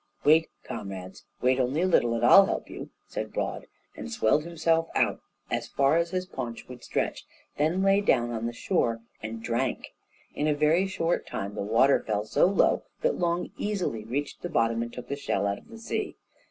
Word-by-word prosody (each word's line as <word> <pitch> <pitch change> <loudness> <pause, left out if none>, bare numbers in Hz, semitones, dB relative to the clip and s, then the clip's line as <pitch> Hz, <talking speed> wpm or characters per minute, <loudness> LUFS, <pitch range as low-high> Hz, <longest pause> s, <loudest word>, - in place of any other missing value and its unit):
"Wait, 160 +2 +5
comrades! 95 -1 -7 0.2
wait 130 +1 +3
only 130 +5 +1
a - - +3
little 120 -10 +3
and 115 +1 +1
I'll 195 +10 +8
help - - -3
you," - - -7 0.2
said - - -5
Broad, - - -3 0.3
and 75 - -7
swelled 110 - +2
himself 165 -1 +1
out - - +1 0.3
as - - -1
far 140 +2 +2
as 170 0 +1
his 185 +1 -2
paunch 125 -10 -6
would 125 -1 -11
stretch; - - -1 0.3
he 145 - -1
then 175 +5 +1
lay 195 +1 +4
down 120 -11 +2
on 115 0 -2
the - - -2
shore 115 -1 0 0.2
and 110 +1 -6
drank. 120 +2 -2 0.4
In 150 - -1
a 150 - +2
very 155 +6 +3
short 175 -3 -1
time 100 +1 -4
the - - -4
water 115 +7 +4
fell 105 -1 -1
so 110 - +3
low 195 - +3 0.2
that - - +1
Long 175 0 0
easily 185 - -2
reached 140 +6 -4
the 175 - -4
bottom 115 -6 +1
and 120 0 -4
took 125 0 -8
the 140 - -2
shell 100 -8 -1
out 100 0 -1
of - - -22
the 230 -1 -11
sea. 225 - -3
135 Hz, 205 wpm, -27 LUFS, 115-170 Hz, 0.4 s, I'll